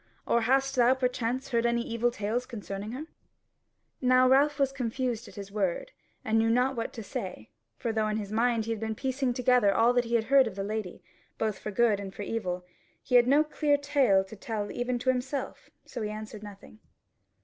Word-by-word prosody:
Or 235 - +2
hast 270 +3 +2
thou 245 +1 +5
perchance 250 0 -2
heard 235 -3 +1
any 235 0 +1
evil 235 +1 0
tales 235 +2 -2
concerning 210 -2 -6
her?" 285 +5 -5 1.0
Now 255 0 +5
Ralph 280 +3 +4
was 275 -2 +2
confused 245 -2 -3
at - - -13
his 200 -1 -8
word, 200 - -1 0.3
and 225 0 +2
knew 225 0 +2
not 250 +3 +2
what 230 -1 -3
to 225 - -7
say; 185 - -6 0.3
for 230 - -2
though 220 -1 +1
in 215 0 -1
his 205 -2 -5
mind 230 0 +1
he 230 - -3
had 225 - -2
been 220 0 -3
piecing 260 0 -1
together 250 -4 +4
all 230 +4 +4
that 245 -1 +2
he 235 +1 -1
had 230 - +3
heard 270 +1 +5
of 205 - -6
the 195 - -3
lady 210 -2 -5 0.3
both 215 -3 -1
for - - -5
good 215 -1 +2
and 195 -1 -7
for 205 - -5
evil, 180 -5 -3 0.4
he 250 - -6
had 245 -1 +6
no 285 +3 +5
clear 300 -1 +1
tale 275 -9 +3
to 190 +3 -11
tell 210 0 -4
even 245 0 -2
to 250 +2 -1
himself: 260 +2 -4 0.2
so 245 - -7
he 210 - -2
answered 215 0 -7
nothing. 205 +1 -12
235 Hz, 210 wpm, -28 LUFS, 215-255 Hz, 1.0 s, had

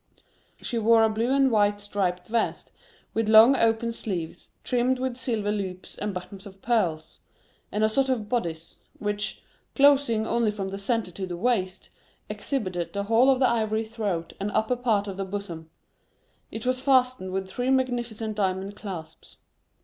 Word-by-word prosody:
She 235 - -2
wore 225 0 +5
a 220 - +4
blue 230 +4 0
and 270 -1 +4
white 205 -2 +3
striped 195 -3 -2
vest, 230 0 -2 0.4
with 225 -1 0
long 225 +5 +8
open 230 -1 +2
sleeves, 180 -8 -5
trimmed 250 +1 +1
with 255 -1 -2
silver 225 -5 -2
loops 190 -3 -5
and 210 0 -3
buttons 190 +2 -8
of 195 -1 -14
pearls, 180 -9 -1 0.5
and 210 - 0
a - - +5
sort 265 +5 +1
of 230 -5 -1
bodice, 170 -9 -3 0.2
which, 205 0 -3 0.3
closing 275 -6 +4
only 235 -1 +1
from 200 -2 -4
the 195 +1 -6
centre 220 -2 -1
to 190 +2 -5
the 175 -1 -5
waist, 190 -4 -1 0.4
exhibited 185 - -3
the 200 - -2
whole 230 +5 +4
of 265 - +4
the 260 - +4
ivory 220 -1 0
throat 205 -7 -3
and 200 - -2
upper 220 +3 +1
part 225 -5 0
of 195 -1 -6
the 195 - -2
bosom; 185 -5 -6 0.8
it 220 +1 -6
was 255 0 0
fastened 255 -8 +2
with 190 0 -2
three 245 +6 -2
magnificent 240 -4 -1
diamond 195 0 -1
clasps. 185 -7 -9
215 Hz, 165 wpm, -26 LUFS, 195-240 Hz, 0.8 s, long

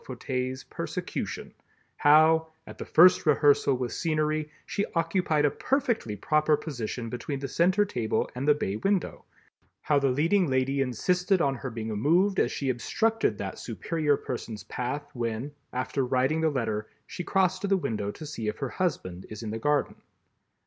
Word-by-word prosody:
Fauteuil's 130 0 -4
persecution—how, 160 +2 0 0.2
at - - -11
the - - -5
first 180 +3 +6
rehearsal 145 -2 +4
with 125 -1 -3
scenery, 155 -1 0 0.2
she 200 - -1
occupied 165 -2 +1
a 145 - +3
perfectly 235 - -1
proper 155 +7 +2
position 120 -5 -5
between 125 +5 -4
the 135 0 -4
center 185 +8 +3
table 115 - -1
and 130 +3 -4
the 150 - +6
bay 105 -8 -2
window, 195 - -1 0.6
how 145 -2 +3
the 140 -1 +2
Leading 165 +8 +2
Lady 130 +1 +1
insisted 180 - +1
on 140 -5 +2
her 135 0 -5
being 115 -1 -5
moved 170 - +2
as - - +2
she 135 -2 -1
obstructed 225 - 0
that - - -5
superior 155 -4 -1
person's 115 -3 -6
path 130 +4 -4
when, 120 +3 -3 0.2
after 130 +2 -1
writing 130 +5 +1
the 160 - +3
letter, 110 -6 -2 0.2
she 180 - -6
crosses 185 +1 +1
to 200 - -2
the 195 0 +3
window 105 - -2
to 155 - -8
see 120 -7 -5
if 105 - -2
her 135 -3 -3
Husband 95 - -3
is 110 +1 -8
in 110 - -4
the 110 - -4
garden. 145 +4 +1
145 Hz, 165 wpm, -27 LUFS, 125-165 Hz, 0.6 s, first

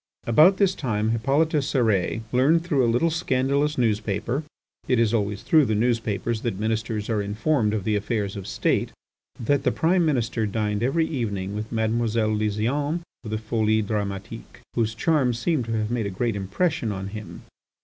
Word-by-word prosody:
About 155 +11 +6
this 195 -2 +3
time 110 - -1
Hippolyte 135 +8 +2
Cérès 115 - +1
learned 145 +7 +3
through 150 -7 +1
a 120 - +3
little 140 +9 +2
scandalous 145 -2 0
newspaper 110 +2 0 0.5
(it 125 - +2
is 115 -1 +2
always 105 -2 -1
through 155 -3 +4
the 110 - 0
newspapers 115 -1 0
that 115 -6 -2
ministers 110 0 -2
are 110 -3 0
informed 105 +3 0
of 105 -3 -2
the 105 +2 0
affairs 105 -1 -2
of 100 -2 -7
State) - - 0 0.5
that 140 +4 +1
the 130 -2 +1
Prime 175 +5 +2
Minister 120 -7 0
dined 105 0 -1
every 140 +7 +2
evening 100 -10 -3
with 105 +1 -5
Mademoiselle 110 -1 0
Lysiane 120 +10 -1 0.2
of 110 - -7
the 110 - -1
Folies 110 0 0
Dramatiques, 100 -2 -5
whose 115 -1 0
charm 135 -2 +2
seemed 125 +2 0
to 115 - -3
have 110 0 -1
made 115 -4 -1
a - - -2
great 110 +3 -1
impression 115 - -1
on 95 -1 -5
him. 105 0 -8
115 Hz, 170 wpm, -24 LUFS, 105-135 Hz, 0.5 s, About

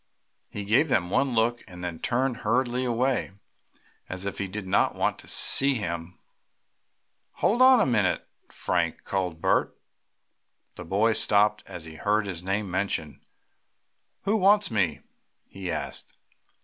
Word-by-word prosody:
He 105 - -6
gave 120 +10 +3
them 90 -7 +1
one 130 +2 +1
look, 120 +2 +1
and 90 -2 -10
then 85 -2 -5
turned 125 0 0
hurriedly 125 +2 0
away, 125 -3 0 0.8
as 95 +1 -6
if 100 - -4
he 100 - -2
did 100 +1 -6
not 95 - +1
want - - -1
them - - -14
to - - -5
see 140 0 +3
him. 85 -5 -5 1.2
"Hold 235 +5 +1
on 260 0 +8
wait - - +4
a - - +1
minute 110 -8 +1 0.2
Frank!" - - -2
called 90 -4 -3
Bert. - - +1 1.0
The - - -9
boy 110 +4 +2
stopped 105 0 +3
as 85 -2 -8
he 80 -1 -10
heard 105 +3 +1
his 90 -4 -5
name 100 +1 -2
mentioned. 90 -6 -2 1.0
"Who 205 +3 +1
wants 205 - +4
me?" 90 -9 0 0.4
he 95 -2 -7
asked. - - -5
105 Hz, 150 wpm, -26 LUFS, 95-125 Hz, 1.2 s, on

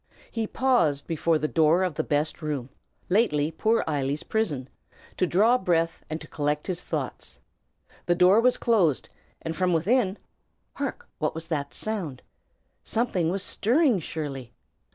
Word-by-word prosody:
He 225 -2 -2
paused 225 - +2
before 165 0 +1
the 155 - -1
door 160 +3 +3
of 180 -3 0
the - - -1
best 150 +3 -1
room, 145 -5 -3 0.4
lately 165 -7 +2
poor 220 +7 +1
Eily's 145 -1 -1
prison, 155 -13 -1 0.5
to 185 - +2
draw 220 +9 +4
breath 165 -2 0
and 155 +1 -3
to 155 - -11
collect 150 -1 -1
his 180 -2 -3
thoughts. - - -5 0.7
The 175 - +3
door 185 +5 +6
was 250 +1 +3
closed, 190 - +2 0.3
and 165 0 -3
from 180 0 +1
within 195 +4 +2 0.6
hark! 280 -1 -4
what 155 - -1
was 165 +1 -7
that 145 -4 -2
sound? 185 -12 -4 0.6
Something 195 -8 0
was 190 +2 -2
stirring, 245 - +2
surely. 140 -7 -6
170 Hz, 150 wpm, -26 LUFS, 150-215 Hz, 0.7 s, door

